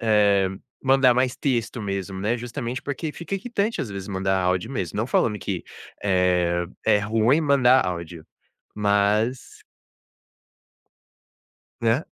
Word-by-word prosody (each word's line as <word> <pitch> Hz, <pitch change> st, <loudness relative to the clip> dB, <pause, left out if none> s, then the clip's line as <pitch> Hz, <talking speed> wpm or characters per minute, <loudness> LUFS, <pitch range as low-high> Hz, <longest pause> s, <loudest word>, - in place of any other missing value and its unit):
eh, 100 Hz, -3 st, +3 dB, 0.3 s
mandar 135 Hz, -1 st, +5 dB
mais 125 Hz, 0 st, +1 dB
texto 120 Hz, -4 st, -1 dB
mesmo, 95 Hz, -1 st, -4 dB
né, 110 Hz, +4 st, 0 dB
justamente 120 Hz, +1 st, -5 dB
porque 145 Hz, +2 st, -4 dB
fica 175 Hz, +3 st, -5 dB
irritante, 215 Hz, +1 st, -2 dB
às 110 Hz, -, -4 dB
vezes, 100 Hz, 0 st, -6 dB
mandar 95 Hz, 0 st, 0 dB
áudio 90 Hz, +5 st, 0 dB
mesmo. 95 Hz, -, -4 dB
Não 110 Hz, +3 st, 0 dB
falando 105 Hz, -4 st, +1 dB
que, -, -, -4 dB, 0.4 s
eh, 90 Hz, -3 st, +2 dB, 0.2 s
é 105 Hz, -, +4 dB
ruim 115 Hz, +8 st, +2 dB
mandar 130 Hz, -3 st, +4 dB
áudio, 85 Hz, -2 st, -6 dB, 0.5 s
mas 105 Hz, +4 st, 0 dB, 2.2 s
Né. 115 Hz, +6 st, +2 dB
110 Hz, 125 wpm, -24 LUFS, 95-130 Hz, 2.2 s, mandar